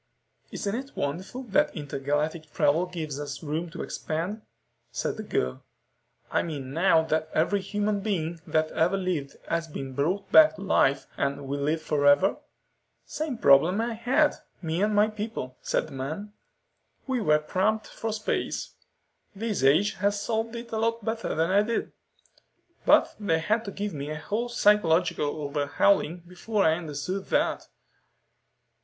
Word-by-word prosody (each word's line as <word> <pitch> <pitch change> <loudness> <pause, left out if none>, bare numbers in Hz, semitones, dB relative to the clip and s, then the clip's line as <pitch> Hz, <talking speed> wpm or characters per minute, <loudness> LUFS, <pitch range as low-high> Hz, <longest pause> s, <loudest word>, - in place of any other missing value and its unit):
"Isn't 200 - -3
it 270 +4 -5
wonderful 185 - -3
that 195 - +2
intergalactic 150 +1 -2
travel 165 +5 +2
gives 155 -5 -5
us 140 -1 -6
room 160 +3 -2
to - - -6
expand?" 175 +8 -3 0.5
said - - -2
the - - -5
girl. 65 +1 -2 0.7
"I - - +2
mean 140 -5 -5
now 165 0 +4
that 155 0 -1
every 195 +6 +2
human 205 +1 -1
being 170 -5 -2
that 155 0 +1
ever 175 +5 +2
lived 180 -7 -2
has 170 0 -1
been 135 -3 -6
brought 170 +9 -1
back 315 -1 +8
to - - -10
life 135 -8 +2
and 140 0 -2
will 140 +1 -2
live 155 +2 0
forever?" 145 +5 +3 0.7
"Same 300 -5 -3
problem 160 +5 +5
I 230 +1 -1
had, 255 +7 +2 0.2
me 165 +1 -2
and 210 0 +2
my 210 +1 +5
people," 215 - -5
said - - 0
the - - -11
man. 155 +11 -5 0.7
"We 260 -3 -1
were 150 -7 +4
cramped 190 +8 0
for 225 - -5
space. 215 0 -2 0.6
This 210 - -2
age 155 +10 +4
has 205 +1 +1
solved 225 +2 -2
it 235 0 -7
a 220 - -1
lot 230 -1 0
better 225 0 -2
than 165 +3 +1
I 200 +2 +5
did. 225 +2 -2 1.0
But - - +5
they 200 -6 +1
had 215 +8 0
to 200 - -4
give 205 +1 -4
me 145 0 -5
a 155 - -3
whole 215 +9 -2
psychological 180 -8 +3 0.2
overhauling 155 +4 +1
before 200 +3 -1
I 160 - +5
understood 165 +4 -4
that." - - 0
180 Hz, 155 wpm, -27 LUFS, 150-210 Hz, 1.0 s, back